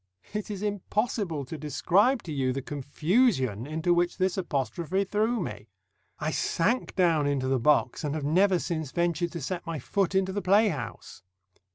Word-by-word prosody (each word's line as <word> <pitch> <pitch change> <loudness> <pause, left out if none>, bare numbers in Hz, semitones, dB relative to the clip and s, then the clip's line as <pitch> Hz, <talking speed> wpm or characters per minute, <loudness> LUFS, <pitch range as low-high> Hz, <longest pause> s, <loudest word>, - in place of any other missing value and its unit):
It 210 0 -3
is 205 -1 -5
impossible 205 - -1
to 155 +4 -7
describe 190 - +2
to 160 - -6
you 130 -2 0
the 135 0 -4
confusion 145 - +1
into 160 +3 +1
which 175 0 +1
this 185 -1 +1
apostrophe 170 - -1
threw 215 +4 0
me. 115 - -5 0.5
I 155 +1 -2
sank 225 +11 0
down 165 -6 +3
into 140 -2 0
the 130 -1 +1
box, 130 +1 +2
and 150 0 -1
have 150 -3 -3
never 185 +5 +4
since 160 -5 -3
ventured 170 0 0
to 170 - -5
set 175 +6 -3
my 165 -1 -3
foot 190 +7 -1
into 190 0 +1
the 205 - -2
playhouse. 195 - 0
170 Hz, 170 wpm, -28 LUFS, 145-195 Hz, 0.5 s, never